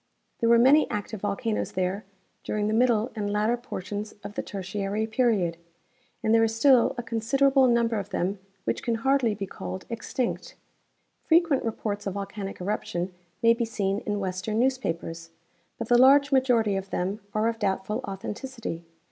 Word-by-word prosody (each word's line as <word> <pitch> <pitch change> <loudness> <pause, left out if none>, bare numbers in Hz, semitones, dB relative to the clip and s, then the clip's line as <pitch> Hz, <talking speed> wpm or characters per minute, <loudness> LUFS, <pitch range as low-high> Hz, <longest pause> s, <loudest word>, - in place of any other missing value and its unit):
There 230 - +2
were 235 - +7
many 270 +6 +5
active 210 0 -4
volcanoes 210 +2 -2
there 185 +3 -1 0.4
during 210 -1 -1
the 215 - 0
middle 235 0 +2
and 205 -2 -2
latter 210 +3 +2
portions 210 -3 -6
of 205 - -7
the - - -2
Tertiary 200 +2 -3
period, 220 -7 +1 0.7
and 220 - +3
there 225 0 +5
is 225 0 +1
still 255 +1 +5
a 240 - -3
considerable 265 +4 +3
number 235 -2 +2
of 200 0 -6
them 190 +1 -1 0.2
which - - -1
can 235 - 0
hardly 250 -2 +2
be 200 -1 -4
called 95 - -7
extinct. 235 +1 -3 0.7
Frequent 325 -4 +3
rej^orts 210 -2 -3
of 195 - -3
volcanic 200 0 -5
eruption 180 -2 -3 0.3
may 230 0 +7
be 235 +1 -1
seen 200 -3 -1
in 205 -1 -3
western 190 +3 -2
neAVspapers, 170 -10 -1 0.5
but 230 - -4
the 240 0 +5
large 280 +2 +6
majority 245 -6 +3
of 195 0 -4
them 190 +4 -2 0.2
are 215 +1 +2
of 230 -1 -2
doubtful 205 +2 -1
authenticity. 205 -1 -5
215 Hz, 165 wpm, -26 LUFS, 195-240 Hz, 0.7 s, were